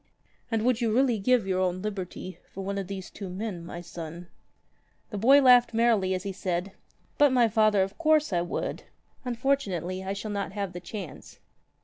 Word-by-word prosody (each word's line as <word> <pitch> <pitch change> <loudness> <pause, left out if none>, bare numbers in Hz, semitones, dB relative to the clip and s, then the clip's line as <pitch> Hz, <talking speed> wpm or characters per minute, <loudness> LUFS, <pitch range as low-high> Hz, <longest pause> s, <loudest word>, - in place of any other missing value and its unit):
"And 225 -2 0
would 250 -1 +2
you 230 -2 +1
really 245 -1 +3
give 245 +1 +3
your 185 -1 0
own 185 0 0
liberty 185 -2 -5
for 195 - -6
one 200 +1 -2
of 195 - -5
these 190 -1 -7
two 195 -2 -7
men, 185 -2 -5
my 175 0 -7
son?" 170 0 -8 0.8
The 205 - -3
boy 270 +6 +6
laughed 245 -2 +6
merrily 220 -5 +3
as 185 - -4
he 200 - -3
said: 185 0 -3 0.5
"But, 290 -2 +6
my 245 -2 +4
father, 215 -2 +3
of 195 +7 -6
course 310 - +3
I 175 - +2
would. 175 - -3 0.4
Unfortunately, 220 - -1
I 190 +1 -2
shall 210 +2 -5
not 200 -1 -3
have 200 -3 -3
the 175 - -5
chance." 180 -3 -8
200 Hz, 190 wpm, -27 LUFS, 185-235 Hz, 0.8 s, boy